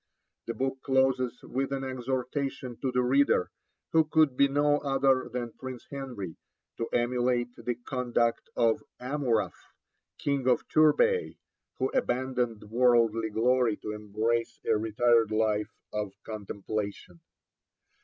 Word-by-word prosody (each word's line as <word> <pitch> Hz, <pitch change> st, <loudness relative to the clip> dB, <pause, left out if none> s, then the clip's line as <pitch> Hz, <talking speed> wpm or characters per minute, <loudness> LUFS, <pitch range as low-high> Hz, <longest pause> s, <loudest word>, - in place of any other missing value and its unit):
The 115 Hz, -, -3 dB
book 135 Hz, +2 st, -2 dB
closes 130 Hz, -2 st, +1 dB
with 135 Hz, +2 st, -2 dB
an 135 Hz, -1 st, -2 dB
exhortation 130 Hz, 0 st, -3 dB
to 130 Hz, -, 0 dB
the 125 Hz, 0 st, +2 dB
reader, 135 Hz, -6 st, +3 dB, 0.4 s
who 160 Hz, -1 st, +5 dB
could 155 Hz, -3 st, +3 dB
be 140 Hz, +2 st, +5 dB
no 145 Hz, +1 st, +2 dB
other 135 Hz, -2 st, +2 dB
than 120 Hz, -2 st, -3 dB
Prince 130 Hz, -2 st, -8 dB
Henry, 125 Hz, -, -6 dB, 0.4 s
to 115 Hz, -, -2 dB
emulate 120 Hz, 0 st, +1 dB
the 120 Hz, -, -3 dB
conduct 120 Hz, -1 st, -1 dB
of 115 Hz, -2 st, +2 dB, 0.2 s
Amurath, 125 Hz, -5 st, -2 dB, 0.4 s
King 140 Hz, -3 st, -1 dB
of 125 Hz, -, +2 dB
Turbay, 155 Hz, -, +3 dB, 0.4 s
who 130 Hz, 0 st, 0 dB
abandoned 125 Hz, -3 st, -1 dB
worldly 115 Hz, 0 st, +3 dB
glory 120 Hz, 0 st, +2 dB
to 105 Hz, -, -6 dB
embrace 110 Hz, +3 st, -1 dB
a -, -, +3 dB
retired 115 Hz, +1 st, +3 dB
life 110 Hz, -1 st, +1 dB, 0.2 s
of 105 Hz, -2 st, -3 dB
contemplation. 100 Hz, -3 st, -5 dB
125 Hz, 125 wpm, -29 LUFS, 115-135 Hz, 0.4 s, who